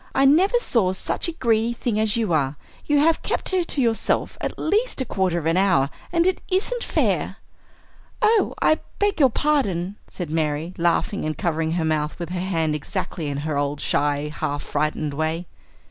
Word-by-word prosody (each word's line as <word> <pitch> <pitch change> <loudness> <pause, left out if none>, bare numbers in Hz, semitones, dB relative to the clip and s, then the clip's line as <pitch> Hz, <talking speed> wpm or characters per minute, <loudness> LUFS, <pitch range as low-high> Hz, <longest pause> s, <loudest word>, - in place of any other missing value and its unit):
I 270 - +4
never 365 - +5
saw 225 - +2
such 190 - -1
a - - -1
greedy 235 -6 +1
thing 230 -2 -1
as 215 0 +2
you 215 -7 0
are; 140 -2 +1 0.3
you 295 - +3
have 320 +3 +3
kept - - -2
her 370 -2 +1
to 290 - 0
yourself 230 -2 0
at - - -3
least 425 +7 0
a 260 - 0
quarter 190 -6 0
of 165 - -3
an 165 +2 +2
hour, 160 -8 +3 0.2
and 340 0 +2
it 375 0 +1
isn't 450 +6 0
fair." - - 0 0.8
"Oh, 435 0 +3
I 310 - +3 0.2
beg 410 -3 +1
your 270 -3 +6
pardon," 210 - 0
said 175 -4 -6
Mary, 155 +1 -1
laughing 175 +4 +1
and 155 -2 -2
covering 160 -1 -1
her 170 -2 0
mouth 155 -1 -1
with 170 -2 -5
her 180 0 -3
hand 165 -4 0
exactly 150 +1 -4
in 140 -1 -3
her 150 -2 0
old, 145 0 -1
shy, 145 +1 0
half 145 0 -2
frightened 150 0 -1
way. 160 +4 -2
185 Hz, 190 wpm, -23 LUFS, -, 0.8 s, your